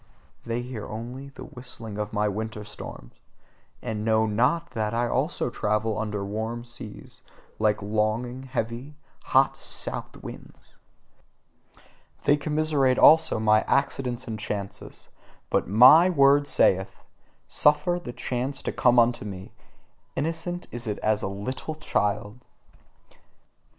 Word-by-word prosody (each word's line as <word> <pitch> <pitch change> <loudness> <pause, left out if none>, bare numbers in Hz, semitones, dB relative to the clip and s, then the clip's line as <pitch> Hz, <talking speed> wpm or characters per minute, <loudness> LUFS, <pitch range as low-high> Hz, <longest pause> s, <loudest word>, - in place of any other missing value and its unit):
They 115 +1 -2
hear 120 -4 -6
only 125 +5 -7
the 140 - -11
whistling 115 -4 -8
of 105 +1 -3
my 105 -1 +1
winter 105 +1 -4
storms: - - -10 0.7
and 105 -1 -3
know 110 0 +3
NOT 125 +11 +1
that 110 -2 -2
I 120 +1 +1
also 130 0 -1
travel 105 0 -1
over 105 -2 -3
warm 110 +3 -4
seas, 120 -3 -8 0.4
like 105 -1 +1
longing, 110 +4 -1
heavy, 130 +2 -4 0.3
hot - - +3
south - - -1
winds. - - -12 1.4
They 145 - +5
commiserate 150 -3 +1
also 160 -7 +6
my 110 0 +4
accidents 130 -3 0
and 110 -1 -4
chances: 100 -2 -6 0.4
but - - +1
MY 130 - +8
word 145 -3 +4
saith: 95 -8 +2 0.4
"Suffer 150 +4 +2
the 120 - -5
chance 130 +3 -4
to - - -2
come 125 -1 +3
unto 120 -1 +3
me: 95 -2 -8 0.6
innocent 165 +4 -3
is 120 0 -5
it 105 - -2
as 110 0 +2
a - - -2
little 115 +10 -5
child!" 105 -6 -1
120 Hz, 125 wpm, -26 LUFS, 105-135 Hz, 1.4 s, MY